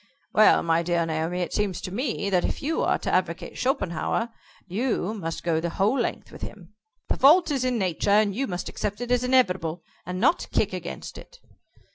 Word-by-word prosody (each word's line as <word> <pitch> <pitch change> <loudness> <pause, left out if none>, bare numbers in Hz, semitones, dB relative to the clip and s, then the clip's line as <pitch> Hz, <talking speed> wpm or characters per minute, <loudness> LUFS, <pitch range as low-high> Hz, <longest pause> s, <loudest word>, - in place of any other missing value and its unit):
"Well, 215 - +6
my 165 0 +2
dear 170 0 0
Naomi, 165 +3 -2
it 175 - -3
seems 200 -4 -1
to 185 - -6
me 225 -4 -2
that 180 -2 +3
if - - -3
you 320 +3 0
are - - +2
to - - -3
advocate 180 -2 -1
Schopenhauer, 230 -2 -1 0.4
you 215 0 -1
must 165 -7 -5
go 165 -2 +1
the 170 +1 -2
whole 195 +8 +1
length 235 - -3
with - - -12
him. 190 -1 -9 0.4
The - - 0
fault 320 +4 +6
is 270 -3 0
in 255 -1 +1
Nature, 185 -3 -1
and 205 0 +4
you 270 +7 -1
must 180 -1 -4
accept 205 0 -3
it 245 0 -4
as 250 0 +3
inevitable, 180 -10 +1 0.2
and 180 +1 -5
not 335 - +2
kick - - +1
against - - -6
it." - - -15
195 Hz, 200 wpm, -25 LUFS, 175-245 Hz, 0.4 s, Well